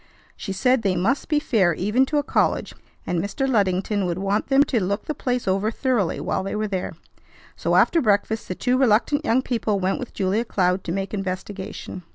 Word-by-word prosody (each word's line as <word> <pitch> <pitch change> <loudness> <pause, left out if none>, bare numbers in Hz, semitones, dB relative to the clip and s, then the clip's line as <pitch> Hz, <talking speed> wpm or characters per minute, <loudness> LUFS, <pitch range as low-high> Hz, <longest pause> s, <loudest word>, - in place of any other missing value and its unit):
She 195 - -6
said 250 +6 +2
they 190 -3 +1
must 210 +11 0
be 300 -2 +3
fair 205 - +2
even 215 +10 +1
to 300 - 0
a 290 - +2
college, - - 0 0.3
and 175 -2 -1
Mr. 270 +7 -2
Luddington 200 -3 +1
would 175 -1 -2
want 195 +2 -1
them 275 +1 +5
to 235 -8 0
look 200 +3 -2
the 305 - -2
place 250 -6 -2
over 195 +3 +1
thoroughly 230 -6 0
while - - -1
they 195 +2 -4
were 215 0 -1
there. 190 -3 -3 0.6
So - - 0
after 335 - +4
breakfast 220 0 +1
the 185 - -4
two 250 +5 +1
reluctant 265 +5 +3
young 255 -2 +2
people 220 -5 -1
went 190 +1 0
with 250 - -8
Julia 200 +3 0
Cloud 185 -4 0
to 165 - -3
make 195 +2 -3
investigation. 190 -1 -5
205 Hz, 205 wpm, -23 LUFS, 190-250 Hz, 0.6 s, them